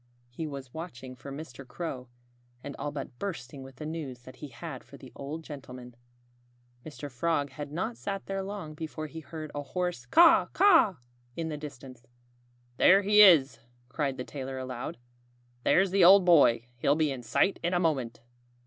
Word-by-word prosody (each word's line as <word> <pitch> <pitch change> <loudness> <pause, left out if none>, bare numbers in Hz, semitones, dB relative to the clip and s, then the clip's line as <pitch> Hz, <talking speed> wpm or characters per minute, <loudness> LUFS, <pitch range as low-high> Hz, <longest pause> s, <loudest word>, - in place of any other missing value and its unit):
He 155 +6 -5
was 135 -3 -8
watching 135 -6 -8
for 140 - -10
Mr. 135 -2 -8
Crow, 130 -1 -6 0.6
and 140 - -7
all 145 - -4
but 135 -4 -7
bursting 140 -9 -6
with 135 0 -11
the 150 - -8
news 150 -6 -6
that 130 +1 -13
he 150 - -8
had 135 +1 -8
for 140 +2 -14
the 130 -1 -13
old 150 +4 -7
gentleman. 130 -5 -10 0.9
Mr. 150 -1 -8
Frog 145 +1 -1
had 145 +1 -7
not 150 -7 -3
sat 195 +11 -5
there 195 0 -3
long 195 -5 -6
before 155 0 -6
he 160 +1 -8
heard 155 -1 -8
a 145 - -3
hoarse 175 -4 -3
Caw, 335 - +6
caw! 330 - +5 0.4
in 165 -1 -3
the 155 - -3
distance. 130 -5 -10 0.7
"There 195 +2 +6
he 210 +1 +6
is!" 165 -9 +6 0.3
cried 135 0 -2
the 125 - -4
tailor 135 -1 -6
aloud. 130 -3 -5 0.7
"There's 190 0 +3
the 195 -1 +4
old 190 +1 +8
boy! 140 -9 +5
He'll 140 +4 +2
be 155 -2 +1
in 130 -2 -5
sight 190 - +1
in 175 +1 0
a - - +2
moment." 135 -10 -1
145 Hz, 175 wpm, -29 LUFS, 130-170 Hz, 0.9 s, old